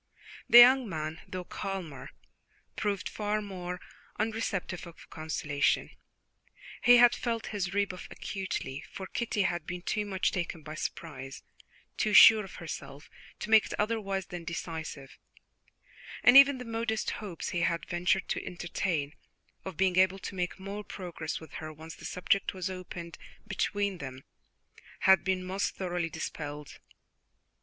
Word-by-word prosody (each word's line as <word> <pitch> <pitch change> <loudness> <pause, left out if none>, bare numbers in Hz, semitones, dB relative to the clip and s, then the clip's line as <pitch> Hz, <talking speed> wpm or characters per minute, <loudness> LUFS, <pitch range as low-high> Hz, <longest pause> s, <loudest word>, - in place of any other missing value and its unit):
The 235 - +9
young 250 -1 +9
man, 155 -1 -4
though 185 -1 -5
calmer, 180 -8 -5 0.7
proved 205 -1 -1
far 210 0 -1
more 180 -3 -5 0.4
unreceptive 210 -5 -2
of 170 - -14
consolation. 155 -2 0 0.9
He 245 0 +8
had 240 0 +7
felt 230 -2 -2
his 195 -2 -2
rebuff 200 -3 -1
acutely, 170 -8 -4
for 190 - -6
Kitty 215 0 -1
had 175 -3 -1
been 175 0 -5
too 210 +1 0
much 190 -2 0
taken 170 -3 -3
by 155 - -7
surprise, 135 -4 -6 0.5
too 215 - +1
sure 215 +4 +10
of 195 - -10
herself, 155 -3 -8 0.3
to 215 - -4
make 220 -1 +7
it - - -4
otherwise 205 -3 -1
than 175 -1 -7
decisive, 160 -4 -6 1.0
and 245 - +7
even 275 0 +9
the 250 - -7
modest 225 -1 -1
hopes 190 -6 -5
he 175 - -1
had 170 -1 0
ventured 180 +1 +1
to - - -1
entertain, 170 -4 -2 0.5
of 190 -5 -7
being 185 -1 +2
able 185 +1 +4
to 195 - -7
make 180 0 -3
more 200 +2 -6
progress 175 -6 -5
with 160 -3 -13
her 155 0 -6
once 160 +1 -10
the - - -12
subject 190 +2 0
was 185 0 -3
opened 175 -2 -8 0.3
between 200 -3 -1
them, 130 -2 -7 0.8
had 190 0 +6
been 190 -1 0
most 190 +2 -2
thoroughly 175 -3 -2
dispelled. 150 -2 -6
185 Hz, 145 wpm, -30 LUFS, 165-205 Hz, 1.0 s, sure